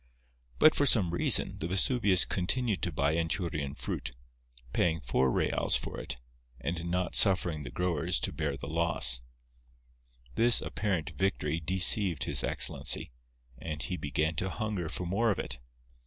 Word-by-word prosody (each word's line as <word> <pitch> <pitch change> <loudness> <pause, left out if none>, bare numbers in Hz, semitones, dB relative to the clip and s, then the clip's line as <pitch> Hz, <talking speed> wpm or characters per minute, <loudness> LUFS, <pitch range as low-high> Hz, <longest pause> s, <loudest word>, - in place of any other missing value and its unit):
But 155 - +5
for 145 - +1
some 100 -10 +4
reason, 85 - +1
the 80 - -4
Vesuvius 95 0 +2
continued 105 +3 -1
to 90 - -2
buy 70 0 -1
Anchurian 80 -4 -3
fruit, - - -6 0.6
paying 80 -2 0
four 65 0 0
reals - - +1
for - - -1
it; - - -7 0.4
and 85 +7 -5
not 90 0 -2
suffering 90 -6 +2
the 65 - -8
growers 85 0 -1
to - - -1
bear 70 -3 -4
the - - -9
loss. 70 -5 +1 1.1
This 115 - +4
apparent 95 -5 -3
victory 80 -2 -2
deceived 95 +1 +5
His - - +4
Excellency; - - +1 0.5
and 75 +2 -5
he 90 - -4
began 75 0 -2
to 95 - -2
hunger 105 -6 -4
for 90 - -5
more 105 +7 0
of 100 - -1
it. 60 -2 -5
85 Hz, 150 wpm, -29 LUFS, 75-95 Hz, 1.1 s, But